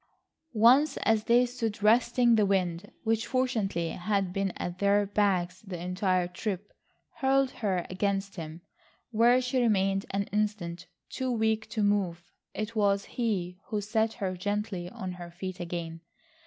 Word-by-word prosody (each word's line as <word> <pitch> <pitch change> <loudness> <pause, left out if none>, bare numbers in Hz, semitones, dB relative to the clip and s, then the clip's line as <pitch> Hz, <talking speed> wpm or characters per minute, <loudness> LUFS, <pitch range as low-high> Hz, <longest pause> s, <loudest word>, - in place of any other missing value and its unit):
Once 260 +7 +5
as 220 -1 +2
they 240 +1 +5
stood 230 -4 -4
resting 240 +2 +4
the 215 -2 +4
wind, 185 -1 0
which 225 0 0
fortunately 220 -10 0
had 195 -1 -1
been 195 0 0
at 175 +1 -5
their 205 0 +3
backs 190 -3 0
the 190 -5 -7
entire 180 0 0
trip, 195 +2 -5 0.4
hurled 270 0 +2
her 190 -5 -1
against 195 +1 -1
him, 160 0 -7 0.5
where 240 +3 +5
she 255 0 0
remained 195 -4 +2
an 195 +1 0
instant, 205 -5 -2 0.2
too 260 0 -3
weak 220 -1 0
to 215 - -1
move. 190 -4 +1 0.3
It 215 +3 -4
was 200 -2 +2
he 185 -7 -1
who 215 - -1
set 220 +2 0
her 190 -5 -3
gently 205 -1 -3
on 185 0 -6
her 175 -1 -8
feet 185 +1 -6
again. 170 -1 -5
205 Hz, 150 wpm, -29 LUFS, 180-225 Hz, 0.5 s, Once